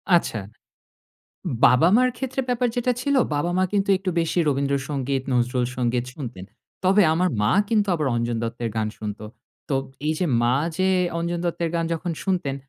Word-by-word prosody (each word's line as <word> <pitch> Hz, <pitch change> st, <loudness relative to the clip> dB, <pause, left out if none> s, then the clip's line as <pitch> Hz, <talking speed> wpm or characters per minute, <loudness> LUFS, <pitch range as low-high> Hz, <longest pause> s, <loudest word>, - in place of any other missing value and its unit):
আচ্ছা। 115 Hz, -9 st, 0 dB, 1.3 s
বাবা-মার 185 Hz, -, +5 dB
ক্ষেত্রে 265 Hz, +1 st, -2 dB
ব্যাপার 245 Hz, 0 st, +1 dB
যেটা 245 Hz, +1 st, +1 dB
ছিল, 280 Hz, +2 st, +1 dB, 0.2 s
বাবা-মা 175 Hz, +5 st, +1 dB
কিন্তু 200 Hz, -1 st, +1 dB
একটু 190 Hz, -1 st, -2 dB
বেশি 165 Hz, +2 st, -1 dB
রবীন্দ্র 140 Hz, 0 st, +1 dB
সঙ্গীত, 135 Hz, -2 st, -1 dB
নজরুল 125 Hz, 0 st, +1 dB
সঙ্গীত 120 Hz, -1 st, 0 dB
শুনতেন। 115 Hz, -10 st, -7 dB, 0.4 s
তবে 195 Hz, +3 st, +5 dB
আমার 180 Hz, +3 st, +2 dB
মা 105 Hz, -, +3 dB, 0.2 s
কিন্তু 210 Hz, -3 st, +2 dB
আবার 155 Hz, -4 st, -1 dB
অঞ্জন 120 Hz, 0 st, -1 dB
দত্তের 115 Hz, 0 st, -3 dB
গান 110 Hz, -1 st, 0 dB
শুনত। 105 Hz, -1 st, -5 dB, 0.5 s
তো 140 Hz, -, 0 dB, 0.3 s
এই 155 Hz, -, +2 dB
যে 180 Hz, -, +1 dB, 0.2 s
মা 120 Hz, +1 st, +3 dB, 0.2 s
যে 185 Hz, 0 st, +2 dB, 0.3 s
অঞ্জন 170 Hz, +1 st, -2 dB
দত্তের 170 Hz, -1 st, -1 dB
গান 165 Hz, 0 st, +1 dB
যখন 175 Hz, +2 st, -4 dB
শুনতেন 180 Hz, -8 st, 0 dB
160 Hz, 160 wpm, -23 LUFS, 125-185 Hz, 1.3 s, বাবা-মার